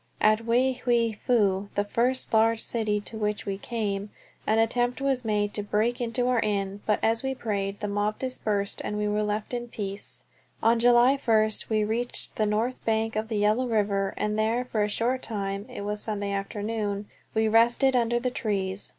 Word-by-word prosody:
At 215 Hz, +1 st, +3 dB
Wei 255 Hz, +3 st, +3 dB
Hwei 235 Hz, -2 st, +2 dB
Fu, 205 Hz, -3 st, +1 dB
the 205 Hz, -, +2 dB
first 240 Hz, +5 st, 0 dB
large 225 Hz, 0 st, +3 dB
city 215 Hz, -3 st, 0 dB
to 220 Hz, +1 st, -7 dB
which 210 Hz, -1 st, -1 dB
we 195 Hz, -1 st, -3 dB
came, 205 Hz, -3 st, -3 dB, 0.4 s
an 220 Hz, -, +3 dB
attempt 245 Hz, +2 st, +1 dB
was 270 Hz, -2 st, 0 dB
made 210 Hz, -2 st, 0 dB
to 210 Hz, -, -1 dB
break 215 Hz, +4 st, 0 dB
into 245 Hz, +1 st, 0 dB
our 250 Hz, -2 st, +2 dB
inn, 200 Hz, -2 st, -1 dB
but 210 Hz, -, +3 dB
as 225 Hz, +1 st, +2 dB
we 265 Hz, 0 st, -2 dB
prayed 200 Hz, -4 st, -3 dB
the 210 Hz, -, -1 dB
mob 205 Hz, +1 st, -1 dB
dispersed 210 Hz, -6 st, -2 dB
and 210 Hz, -, -3 dB
we 210 Hz, 0 st, 0 dB
were 210 Hz, 0 st, 0 dB
left 210 Hz, +2 st, -2 dB
in 240 Hz, 0 st, -3 dB
peace. 200 Hz, -3 st, -3 dB, 0.4 s
On 230 Hz, +1 st, +4 dB
July 245 Hz, +3 st, +5 dB
first 220 Hz, -5 st, +1 dB
we 215 Hz, -1 st, +2 dB
reached 230 Hz, +3 st, 0 dB
the 215 Hz, -, +2 dB
north 225 Hz, +5 st, -1 dB
bank 225 Hz, 0 st, 0 dB
of 215 Hz, +1 st, -1 dB
the 220 Hz, -2 st, -2 dB
Yellow 215 Hz, +5 st, +2 dB
River, 200 Hz, -3 st, 0 dB
and 210 Hz, 0 st, -1 dB
there 230 Hz, +3 st, +1 dB
for 225 Hz, -4 st, -1 dB
a 210 Hz, -, 0 dB
short 245 Hz, +5 st, 0 dB
time 200 Hz, -2 st, -3 dB
(it -, -, -7 dB
was 210 Hz, +1 st, -2 dB
Sunday 205 Hz, -2 st, -2 dB
afternoon) 205 Hz, +1 st, -3 dB, 0.3 s
we 220 Hz, 0 st, +3 dB
rested 240 Hz, +4 st, +4 dB
under 240 Hz, -1 st, +2 dB
the 250 Hz, +1 st, -1 dB
trees. 195 Hz, -4 st, -2 dB
215 Hz, 195 wpm, -27 LUFS, 205-235 Hz, 0.4 s, July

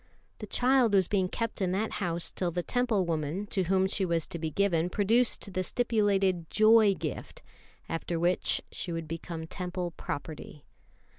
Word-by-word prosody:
The -, -, -7 dB
child 250 Hz, -4 st, +3 dB
was 190 Hz, -3 st, +4 dB
being 190 Hz, -3 st, +1 dB
kept 230 Hz, -1 st, -3 dB
in 185 Hz, -1 st, +1 dB
that 215 Hz, +3 st, -1 dB
house 170 Hz, -2 st, 0 dB
till 180 Hz, -, -1 dB
the 175 Hz, +1 st, -3 dB
Temple 245 Hz, -5 st, +1 dB
woman 165 Hz, +3 st, -2 dB
to 190 Hz, -3 st, 0 dB
whom 190 Hz, +2 st, +2 dB
she 195 Hz, +1 st, -1 dB
was 170 Hz, -3 st, 0 dB
to 170 Hz, -, -5 dB
be 160 Hz, 0 st, -2 dB
given 175 Hz, -1 st, +1 dB
produced 210 Hz, +1 st, +1 dB
the 185 Hz, -, 0 dB
stipulated 195 Hz, -6 st, +1 dB
"Joy 215 Hz, -2 st, +5 dB
gift," 155 Hz, -6 st, -6 dB, 0.4 s
after 165 Hz, 0 st, -3 dB
which 175 Hz, +2 st, +2 dB
she 175 Hz, -, -3 dB
would 165 Hz, -1 st, -4 dB
become 165 Hz, 0 st, -6 dB
Temple 180 Hz, +1 st, -4 dB
property. 150 Hz, -2 st, -7 dB
185 Hz, 165 wpm, -29 LUFS, 170-205 Hz, 0.4 s, Joy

